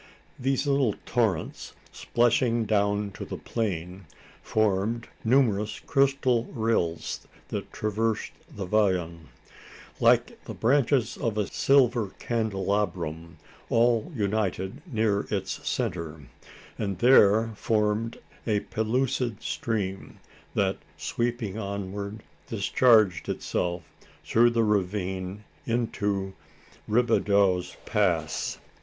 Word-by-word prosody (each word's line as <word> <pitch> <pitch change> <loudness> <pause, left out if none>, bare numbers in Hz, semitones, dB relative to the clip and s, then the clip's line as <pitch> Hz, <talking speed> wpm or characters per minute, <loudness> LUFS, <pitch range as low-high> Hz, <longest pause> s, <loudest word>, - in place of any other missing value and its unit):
These 135 +2 0
little 140 -6 +2
torrents, 110 -10 -1 0.4
plashing 120 -1 +3
down 100 -1 +1
to - - -7
the - - -6
plain, 95 -4 -3 0.4
formed 110 +2 0 0.2
numerous 110 -4 +2
crystal 135 -3 +2
rills 110 -10 -1 0.2
that - - -5
traversed 110 +1 -1 0.2
the 100 - -6
vallon. 90 -6 0 0.7
Like - - +3
the - - -7
branches 130 0 +2
of 110 -3 -2
a 105 - +1
silver 125 -6 +3
candelabrum, 95 -7 -2 0.3
all 115 +4 +2
united 100 - -1
near 110 -3 +1
its 95 -3 -3
centre, 80 -3 -3 0.6
and 100 -3 -2
there 110 -1 +5
formed 110 +1 0 0.3
a 105 -2 +2
pellucid 120 0 -1
stream, 100 -4 -3 0.4
that, - - +1 0.2
sweeping 120 -3 -2
onward, 100 +1 -5 0.2
discharged 110 -3 +3
itself 85 -1 -2 0.4
through 120 +1 +5
the 115 -1 +2
ravine 95 -1 -1 0.2
into 105 -5 -1 0.6
Robideau's 100 -5 +2
Pass. 85 -7 0
105 Hz, 95 wpm, -27 LUFS, 95-115 Hz, 0.7 s, there